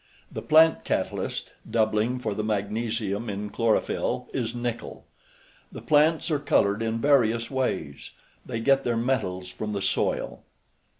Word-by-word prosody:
The - - -5
plant 160 +1 +5
catalyst - - -2 0.2
(doubling 110 +2 +1
for 110 -4 -3
the 105 - -3
magnesium 110 +1 -2
in 105 +1 -4
chlorophyll) 115 -2 0
is 120 -3 -2
nickel. 120 -1 -5 0.7
The - - -8
plants 155 +2 +3
are 150 - +1
colored 105 -7 +2
in 115 0 -1
various 115 -4 +2
ways. 100 - -2 0.3
They 115 - -4
get 135 +3 +3
their 120 -1 0
metals 105 -7 -1
from 105 +3 -5
the 100 - -2
soil. - - -1
115 Hz, 135 wpm, -26 LUFS, 105-130 Hz, 0.7 s, plant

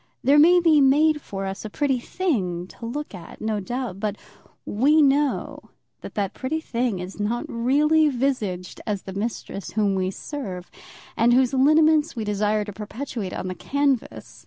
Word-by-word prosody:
There 285 +2 +5
may 350 +4 +7
be 320 -4 +4
made 300 +3 +4
for 195 -5 -5
us 195 0 -5
a 215 - -5
pretty 270 +2 0
thing 205 - -2
to 230 - -9
look 295 +3 -5
at, 175 -3 -10
no 215 -1 -1
doubt; 240 -1 -4
but 210 -1 -2 0.5
we 280 +9 +3
know 285 -1 +2 0.4
that - - -10
that 200 -3 -1
pretty 285 +5 -3
thing 245 - -2
is 180 +3 -7
not 225 +4 -1
really 300 +6 +3
visaged 235 -9 -2
as 205 -3 -2
the 190 - -7
mistress 200 -1 -5
whom 205 -2 +1
we 185 -1 0
serve, 190 -5 -7 0.4
and 235 +2 +4
whose 255 +1 +3
lineaments 310 +3 +4
we 225 - -3
desire 210 0 0
to 205 - -7
perpetuate 215 0 -5
on - - -4
the 185 - -3
canvas. 275 +7 -2
240 Hz, 170 wpm, -24 LUFS, 200-285 Hz, 0.5 s, may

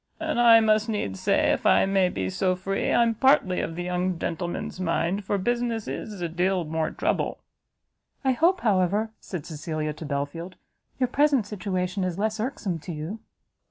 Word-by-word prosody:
And 310 -5 -1
I 230 -1 +8
must 215 0 +2
needs 100 - -2
say, - - +2
if - - -1
I - - +5
may 195 -1 +2
be 95 - -3
so 185 - +1
free, 195 +2 -2
I'm 235 -1 +4
partly 225 -6 +3
of 165 - -4
the 175 - -3
young 180 0 -1
gentleman's 175 +2 -4
mind, 185 +2 0
for 200 +1 0
business 235 +1 -1
is 205 -4 -5
a 170 - 0
deal 180 +1 0
more 160 0 -1
trouble." - - -1 0.9
"I 265 - +4
hope, 340 +8 +2
however," 205 +1 +1
said 175 -6 -6
Cecilia 155 -1 -4
to 155 - -9
Belfield, 145 +6 -4 0.4
"your 255 - +3
present 280 -3 +2
situation 190 -2 -2
is 180 -1 -2
less 215 +1 -1
irksome 215 -7 -2
to 170 - -7
you?" 160 +8 -5
190 Hz, 175 wpm, -26 LUFS, 170-220 Hz, 0.9 s, I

